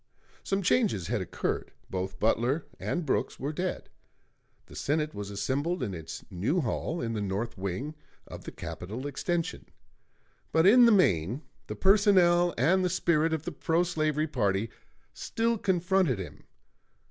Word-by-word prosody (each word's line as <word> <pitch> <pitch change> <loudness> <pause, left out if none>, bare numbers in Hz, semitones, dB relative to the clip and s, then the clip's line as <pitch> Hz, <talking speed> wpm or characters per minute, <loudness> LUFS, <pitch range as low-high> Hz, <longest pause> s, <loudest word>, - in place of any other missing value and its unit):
Some 195 0 -1
changes 180 - +2
had - - 0
occurred: - - -3 0.2
both 95 0 -4
Butler 120 +7 +1
and 175 -2 -2
Brooks 135 - -1
were 145 +3 -3
dead; 180 +4 -3 0.8
the - - -14
Senate 150 +1 -1
was 100 -1 -6
assembled 140 - -1
in 100 - -3
its 80 -3 -7
new 110 - 0
hall 155 +6 -2
in 115 -1 -2
the 105 - -2
north 100 +4 -2
wing 100 - -4 0.3
of - - -10
the - - -6
Capitol 110 +9 -6
extension. 165 +4 -2 0.8
But 160 +1 +3
in 240 +5 +8
the 235 - +6
main 120 - +2 0.2
the - - -5
personnel 185 -4 +5
and 175 +10 +3
the 180 - +2
spirit 165 -3 +2
of 160 -1 -2
the 175 - -3
pro 165 +3 +1
slavery 155 -3 0
party 105 -6 0 0.4
still 230 0 -1
confronted 185 - +2
him. 95 - -8
155 Hz, 150 wpm, -29 LUFS, 110-180 Hz, 0.8 s, in